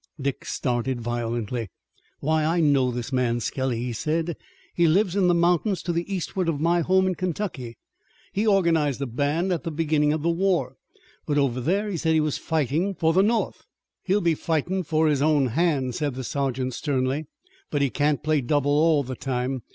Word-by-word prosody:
Dick 140 Hz, -1 st, -3 dB
started 125 Hz, 0 st, -1 dB
violently. 120 Hz, -1 st, -3 dB, 0.5 s
"Why, 155 Hz, +1 st, +1 dB
I 165 Hz, +3 st, +1 dB
know 140 Hz, -5 st, +3 dB
this 125 Hz, +2 st, -4 dB
man 120 Hz, -2 st, +1 dB
Skelly," 130 Hz, 0 st, -2 dB
he 125 Hz, -1 st, -3 dB
said. 160 Hz, +7 st, -1 dB, 0.4 s
"He 170 Hz, -1 st, +3 dB
lives 190 Hz, +3 st, +2 dB
in 195 Hz, -3 st, +3 dB
the 175 Hz, -, +4 dB
mountains 175 Hz, +2 st, +1 dB
to 175 Hz, -, -1 dB
the 170 Hz, +4 st, -3 dB
eastward 185 Hz, -1 st, -2 dB
of 150 Hz, -4 st, -1 dB
my 170 Hz, +3 st, +2 dB
home 190 Hz, +3 st, +3 dB
in 185 Hz, -, +1 dB
Kentucky. 170 Hz, -, -4 dB, 0.6 s
He 210 Hz, +3 st, 0 dB
organized 165 Hz, -, +2 dB
a -, -, -1 dB
band 145 Hz, +9 st, 0 dB
at 170 Hz, -, -2 dB
the 170 Hz, -, -3 dB
beginning 150 Hz, -1 st, +1 dB
of 155 Hz, 0 st, -2 dB
the 170 Hz, -, +2 dB
war, 170 Hz, -8 st, 0 dB, 0.5 s
but 145 Hz, -, 0 dB
over 130 Hz, -3 st, +1 dB
there 195 Hz, -, 0 dB
he 195 Hz, -4 st, -3 dB
said 160 Hz, 0 st, +1 dB
he -, -, +4 dB
was 155 Hz, -2 st, -1 dB
fightin' 160 Hz, +5 st, 0 dB
for 160 Hz, -1 st, +2 dB
the 185 Hz, -, +5 dB
North." 220 Hz, +3 st, 0 dB, 0.4 s
"He'll 200 Hz, +2 st, +1 dB
be 170 Hz, -1 st, +2 dB
fightin' 165 Hz, +4 st, -1 dB
for 160 Hz, -1 st, +1 dB
his 145 Hz, -3 st, +1 dB
own 145 Hz, -3 st, +3 dB
hand," 140 Hz, -2 st, +1 dB
said 145 Hz, -1 st, -2 dB
the 130 Hz, -, -5 dB
sergeant 130 Hz, -1 st, -2 dB
sternly. 135 Hz, +2 st, -1 dB, 0.4 s
"But 145 Hz, -, 0 dB
he 135 Hz, -, +1 dB
can't 145 Hz, 0 st, 0 dB
play 155 Hz, -1 st, +2 dB
double 145 Hz, +2 st, +1 dB
all 150 Hz, 0 st, +3 dB
the 130 Hz, 0 st, -5 dB
time. 130 Hz, 0 st, -2 dB
150 Hz, 195 wpm, -25 LUFS, 130-170 Hz, 0.6 s, the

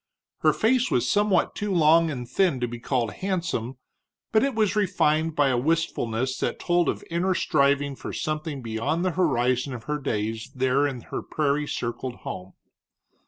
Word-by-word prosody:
Her -, -, +4 dB
face 250 Hz, +3 st, +2 dB
was 125 Hz, 0 st, +1 dB
somewhat 205 Hz, -3 st, +2 dB
too 210 Hz, -1 st, -3 dB
long 165 Hz, -1 st, +5 dB
and 125 Hz, -5 st, -5 dB
thin 175 Hz, -3 st, +1 dB
to 120 Hz, -, +1 dB
be 120 Hz, 0 st, -7 dB
called 120 Hz, -2 st, -1 dB
handsome, 175 Hz, -, -2 dB, 0.5 s
but 220 Hz, +1 st, +4 dB
it 275 Hz, -3 st, 0 dB
was 215 Hz, -2 st, +2 dB
refined 165 Hz, -6 st, +1 dB
by 145 Hz, -3 st, +3 dB
a 125 Hz, -, +1 dB
wistfulness 130 Hz, -5 st, -1 dB
that -, -, -1 dB
told 175 Hz, -1 st, +1 dB
of -, -, -3 dB
inner 180 Hz, +2 st, +1 dB
striving 140 Hz, -2 st, +2 dB
for -, -, -7 dB
something 155 Hz, -3 st, -3 dB
beyond 115 Hz, +10 st, -1 dB
the 185 Hz, -, +2 dB
horizon 130 Hz, -6 st, +1 dB
of 115 Hz, -, -8 dB
her 150 Hz, +3 st, -2 dB
days 110 Hz, -3 st, -3 dB
there 130 Hz, +2 st, +2 dB
in 130 Hz, -4 st, -5 dB
her -, -, -5 dB
prairie 150 Hz, -1 st, -1 dB
circled 120 Hz, 0 st, -4 dB
home. 95 Hz, +1 st, -6 dB
145 Hz, 170 wpm, -25 LUFS, 125-175 Hz, 0.5 s, long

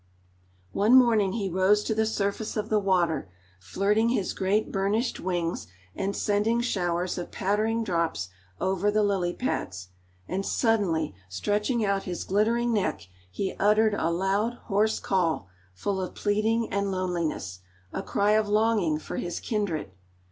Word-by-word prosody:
One 215 Hz, +5 st, +4 dB
morning 225 Hz, -7 st, +5 dB
he 205 Hz, -3 st, -1 dB
rose 190 Hz, +3 st, +3 dB
to 220 Hz, -, -1 dB
the 220 Hz, 0 st, +1 dB
surface 210 Hz, +1 st, -2 dB
of 215 Hz, +1 st, -2 dB
the 215 Hz, -, +3 dB
water, 175 Hz, -, +1 dB, 0.3 s
flirting 205 Hz, -, +1 dB
his 210 Hz, -6 st, 0 dB
great 200 Hz, +3 st, 0 dB
burnished 205 Hz, +5 st, 0 dB
wings, 175 Hz, -, -2 dB, 0.3 s
and 195 Hz, +1 st, -2 dB
sending 210 Hz, +3 st, +1 dB
showers 180 Hz, -6 st, -1 dB
of 175 Hz, -, -5 dB
pattering 215 Hz, +4 st, 0 dB
drops 165 Hz, -, -1 dB, 0.3 s
over 190 Hz, +2 st, +1 dB
the 210 Hz, 0 st, +2 dB
lily 195 Hz, -4 st, +1 dB
pads, 95 Hz, -, -3 dB, 0.4 s
and 195 Hz, +1 st, -2 dB
suddenly 195 Hz, -, +1 dB, 0.2 s
stretching 210 Hz, -, 0 dB
out 200 Hz, -1 st, 0 dB
his 175 Hz, -2 st, -4 dB
glittering 230 Hz, +4 st, +1 dB
neck 185 Hz, -, -1 dB, 0.2 s
he 190 Hz, -, -3 dB
uttered 215 Hz, +1 st, +4 dB
a 165 Hz, -5 st, 0 dB
loud, 195 Hz, +6 st, 0 dB
hoarse 215 Hz, +1 st, +1 dB
call, 170 Hz, -, 0 dB, 0.3 s
full 190 Hz, -, -2 dB
of 185 Hz, -, -5 dB
pleading 220 Hz, +2 st, 0 dB
and 200 Hz, 0 st, 0 dB
loneliness 170 Hz, -, -2 dB, 0.3 s
a -, -, -2 dB
cry 200 Hz, +1 st, +1 dB
of 215 Hz, -1 st, +2 dB
longing 210 Hz, -7 st, +2 dB
for 155 Hz, -, -6 dB
his 175 Hz, -1 st, -3 dB
kindred. 200 Hz, -, -2 dB
200 Hz, 150 wpm, -27 LUFS, 180-215 Hz, 0.4 s, morning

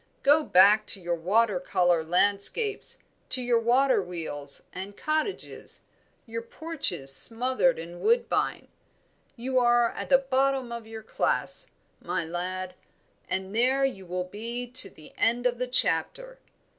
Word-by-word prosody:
Go 295 Hz, +3 st, +4 dB
back 205 Hz, -1 st, +4 dB
to -, -, +1 dB
your 175 Hz, -1 st, -3 dB
water 195 Hz, +4 st, +1 dB
colour 175 Hz, -2 st, +1 dB
landscapes, 200 Hz, -, +1 dB, 0.3 s
to 255 Hz, -, +2 dB
your 245 Hz, -2 st, +1 dB
water 250 Hz, +1 st, +2 dB
wheels 160 Hz, -6 st, -4 dB
and 195 Hz, +2 st, -8 dB
cottages, 310 Hz, +6 st, -3 dB, 0.4 s
your 230 Hz, -1 st, -6 dB
porches 230 Hz, -, 0 dB
smothered 255 Hz, -, +4 dB
in 170 Hz, +2 st, -9 dB
woodbine; 470 Hz, +2 st, 0 dB, 0.7 s
you 255 Hz, +1 st, -1 dB
are 240 Hz, -1 st, +3 dB
at -, -, -7 dB
the 270 Hz, -, +6 dB
bottom 270 Hz, -1 st, -1 dB
of 235 Hz, -1 st, -7 dB
your 220 Hz, 0 st, -9 dB
class, -, -, 0 dB, 0.3 s
my 170 Hz, -, -3 dB
lad, 180 Hz, +2 st, -5 dB, 0.6 s
and 190 Hz, +2 st, -4 dB
there 260 Hz, +4 st, +2 dB
you 195 Hz, -9 st, -5 dB
will 180 Hz, +1 st, -3 dB
be 230 Hz, +6 st, -6 dB
to 255 Hz, -6 st, +5 dB
the 155 Hz, -, -16 dB
end 240 Hz, +2 st, +1 dB
of 245 Hz, -1 st, 0 dB
the 250 Hz, -, -2 dB
chapter." -, -, 0 dB
230 Hz, 140 wpm, -26 LUFS, 185-260 Hz, 0.7 s, the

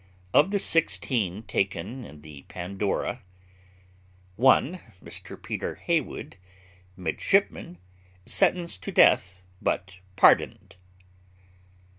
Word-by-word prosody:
Of 150 Hz, +6 st, +5 dB
the 200 Hz, -, +1 dB
sixteen 120 Hz, -, 0 dB
taken 100 Hz, +5 st, -3 dB
in 75 Hz, -4 st, -13 dB
the 75 Hz, -3 st, -11 dB
Pandora: 100 Hz, +6 st, -3 dB, 1.1 s
1. 135 Hz, -, +3 dB, 0.2 s
Mr -, -, -8 dB
PETER -, -, -4 dB
HEYWOOD, -, -, -3 dB, 0.6 s
midshipman, 90 Hz, -1 st, 0 dB, 0.3 s
} 90 Hz, 0 st, -30 dB
sentenced 170 Hz, -, +1 dB
to -, -, -5 dB
death, 90 Hz, 0 st, +4 dB, 0.2 s
but 95 Hz, 0 st, -2 dB, 0.2 s
pardoned. 95 Hz, -, +3 dB
100 Hz, 90 wpm, -26 LUFS, 90-130 Hz, 1.1 s, Of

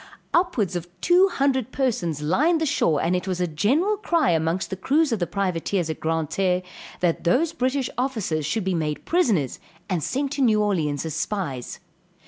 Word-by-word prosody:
Upwards 335 Hz, -, +1 dB
of 175 Hz, 0 st, -3 dB
two 360 Hz, -, +5 dB
hundred 265 Hz, -, 0 dB
persons 175 Hz, -, -1 dB
lined 300 Hz, -, +2 dB
the 320 Hz, -, 0 dB
shore, 165 Hz, -, +2 dB
and 175 Hz, +2 st, +1 dB
it 180 Hz, +1 st, -2 dB
was 185 Hz, -1 st, -2 dB
a 180 Hz, -, +2 dB
general 265 Hz, -, +1 dB
cry 335 Hz, -, +2 dB
amongst 165 Hz, +4 st, 0 dB
the -, -, -1 dB
crews 285 Hz, -, +1 dB
of 225 Hz, -, 0 dB
the 175 Hz, -, -1 dB
privateers 180 Hz, -1 st, -1 dB
at 155 Hz, -, -7 dB
Grand 160 Hz, -1 st, -1 dB
Terre, 185 Hz, -1 st, +1 dB, 0.4 s
that 175 Hz, -2 st, +1 dB
those 295 Hz, -, +2 dB
British 260 Hz, -3 st, 0 dB
officers 220 Hz, -, -1 dB
should 170 Hz, +9 st, -1 dB
be 190 Hz, 0 st, 0 dB
made 155 Hz, -3 st, -2 dB
prisoners 215 Hz, -, +1 dB, 0.3 s
and 180 Hz, -5 st, -1 dB
sent 275 Hz, +1 st, -1 dB
to 290 Hz, -1 st, -2 dB
New 220 Hz, -5 st, +4 dB
Orleans 165 Hz, -9 st, 0 dB
as 160 Hz, -, -3 dB
spies. 150 Hz, -, -3 dB
195 Hz, 185 wpm, -24 LUFS, 165-270 Hz, 0.4 s, two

